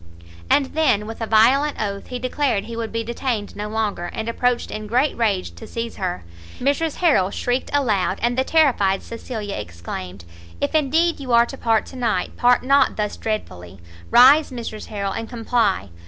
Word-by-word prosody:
And 275 -2 +2
then, 300 -10 +2
with 225 +2 -8
a 225 - -2
violent 260 +7 +4
oath, 200 -2 -3
he 250 - -5
declared 255 -4 -1
he 230 - -7
would 230 -1 -4
be 230 0 -2
detained 235 -2 -3
no 210 +1 -4
longer, 215 -5 -2
and 220 +5 -5
approached 245 +1 0
in 215 0 -5
great 255 +7 +1
rage 205 -6 0
to 220 - -11
seize 230 +1 -5
her; 180 - -3 0.4
Mrs 285 +4 0
Harrel 285 - +3
shrieked 245 +5 -2
aloud, 215 -9 +1
and 240 +1 +1
the 260 - +2
terrified 255 -12 +2
Cecilia 225 -3 -6
exclaimed, 90 0 -7 0.3
"If - - -1
indeed 315 +3 +2
you 260 -3 -3
are 235 0 +6
to 270 - -8
part 225 -4 +1
to - - -12
night, 225 -7 -1
part 245 0 +3
not 275 +1 +3
thus 210 -1 -2
dreadfully! 95 - -5 0.3
rise, 280 +5 +7
Mrs 230 -4 -7
Harrel, 200 -2 -3
and 225 0 -5
comply! 225 - 0
230 Hz, 180 wpm, -21 LUFS, 205-260 Hz, 0.4 s, rise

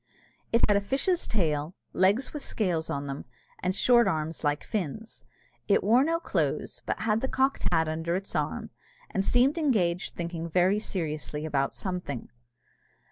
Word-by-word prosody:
It 230 - +3
had 205 - +4
a 200 - +3
fish's 280 - 0
tail, 155 -5 0 0.2
legs 200 +8 +2
with 295 - -4
scales 175 -11 -1
on 140 0 -2
them, 140 0 -5 0.4
and 185 +1 -1
short 240 +2 +5
arms 155 0 -2
like 145 0 0
fins. 215 +3 -4 0.4
It 200 - +3
wore 235 +6 +5
no 330 +2 +1
clothes, - - -1
but - - -2
had 220 0 +1
the 265 - 0
cocked 265 +1 +1
hat 160 -2 +3
under 165 +2 -1
its 195 +1 -4
arm, - - -2 0.4
and 195 - 0
seemed 255 - +3
engaged 185 - +1
thinking 170 -1 -4
very 185 +4 +3
seriously 155 -6 -3
about 140 -3 0
something. 180 - -4
185 Hz, 160 wpm, -28 LUFS, 160-225 Hz, 0.4 s, short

